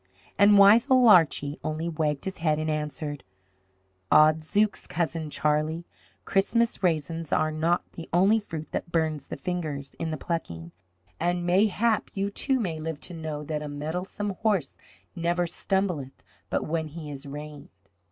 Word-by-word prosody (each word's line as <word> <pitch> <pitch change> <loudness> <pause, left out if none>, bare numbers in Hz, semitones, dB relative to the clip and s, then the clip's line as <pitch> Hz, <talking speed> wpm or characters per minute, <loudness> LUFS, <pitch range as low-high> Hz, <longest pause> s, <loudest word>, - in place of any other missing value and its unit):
And 205 +1 +6
wise 210 +5 +7
old 255 -3 +6
Archie 155 -6 +4
only 155 +2 -2
wagged 155 -3 -1
his 190 -2 -5
head 155 -2 +1
and 155 0 -1
answered, 150 -1 -4 0.9
"Odd 155 +1 +6
zooks, 205 +5 0
Cousin 160 -2 -2
Charlie, 155 +3 0 0.4
Christmas 230 +4 +1
raisins 165 -2 -1
are 155 0 +2
not 165 +3 +1
the 165 - -9
only 195 +6 +4
fruit 160 -7 -7
that 170 - -4
burns 155 -4 -1
the - - -6
fingers 150 -5 -4
in 165 - -2
the 155 - -3
plucking, 85 - -4 0.5
and 175 +1 0
mayhap 210 +5 +2
you 200 0 -1
too 265 +5 0
may 170 -8 -2
live 160 -1 -4
to 180 - -7
know 155 -2 -5
that 150 0 -3
a 150 - -5
mettlesome 180 +8 -4
horse 200 -11 +1 0.4
never 175 +1 0
stumbleth 175 -6 -2 0.3
but - - -1
when 160 0 -2
he 155 -1 -8
is 140 0 -8
reined." 150 0 -8
160 Hz, 155 wpm, -27 LUFS, 150-190 Hz, 0.9 s, wise